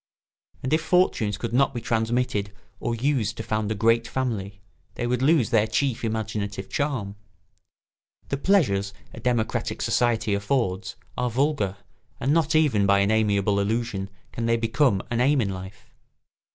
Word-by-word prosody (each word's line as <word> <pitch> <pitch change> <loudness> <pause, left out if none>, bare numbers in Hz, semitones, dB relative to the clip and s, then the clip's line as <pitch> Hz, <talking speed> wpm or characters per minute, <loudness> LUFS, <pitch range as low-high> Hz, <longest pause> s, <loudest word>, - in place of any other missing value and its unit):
And 130 - -1
if 155 - +3
fortunes 155 - +2
could 115 +2 -4
not 135 +1 +3
be - - -1
transmitted 115 -3 0 0.3
or 120 - -2
used 115 -3 0
to - - -4
found 110 -1 -1
a - - 0
great 115 +2 +2
family 105 -7 -3 0.4
they - - -2
would 125 +1 0
lose 140 -4 +3
their 110 -1 +3
chief 130 -1 0
imaginative 105 -3 -3
charm. 120 -9 -2 1.1
The 140 - -1
pleasures 115 - +2 0.2
a - - -9
democratic 120 -3 -1
society 115 -3 +1
affords 100 -2 -1 0.2
are 125 0 0
vulgar 120 -6 0 0.4
and 135 +3 +1
not 160 -1 +2
even 130 -11 +3
by 100 0 +5
an 100 +2 +2
amiable 100 -2 +2
illusion 105 -1 -1 0.2
can 115 -1 -3
they 115 0 +3
become 115 -2 +2
an 120 0 +1
aim 140 +2 +4
in 100 -5 0
life. 95 +1 -9
115 Hz, 155 wpm, -25 LUFS, 100-130 Hz, 1.1 s, by